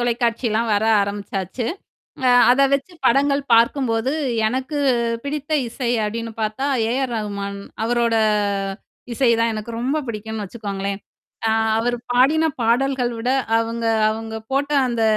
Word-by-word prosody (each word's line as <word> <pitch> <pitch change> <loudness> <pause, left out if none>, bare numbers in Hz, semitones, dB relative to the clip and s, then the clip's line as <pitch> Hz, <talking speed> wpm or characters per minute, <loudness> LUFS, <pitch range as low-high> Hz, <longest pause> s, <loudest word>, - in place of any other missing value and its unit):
தொலைக்காட்சிலாம் 235 -1 0
வர 205 +2 +1 0.2
ஆரம்பிச்சாச்சு. 200 +2 -3 0.6
அ - - +5 0.2
அத 255 +3 +4
வச்சு 280 +6 -3
படங்கள் 280 +3 +3
பார்க்கும்போது, 235 +1 +2 0.3
எனக்கு 260 +5 -2 0.5
பிடித்த 290 +1 -4 0.2
இசை 235 +1 -3
அப்படின்னு 230 +2 -4
பார்த்தா 215 +6 -1 0.2
ஏ - - 0
ஆர் 245 - -5
ரகுமான். 200 -2 -4 0.3
அவரோட 235 0 +1 1.0
இசை 245 0 +3
தான் 230 0 +2
எனக்கு 215 +2 -6
ரொம்ப 275 +5 0
பிடிக்கும்ன்னு 220 -1 -5
வச்சுக்கோங்களேன். 200 -2 -4 0.5
அ - - +2 0.3
அவர் 245 +1 0 0.2
பாடின 280 +6 +4 0.2
பாடல்கள் 245 +1 +1
விட, 245 +3 -1 0.3
அவங்க 230 0 -2 0.3
அவங்க 225 0 -5 0.2
போட்ட 280 +1 0 0.2
அந்த 235 -2 -1
235 Hz, 125 wpm, -21 LUFS, 220-260 Hz, 1.0 s, அ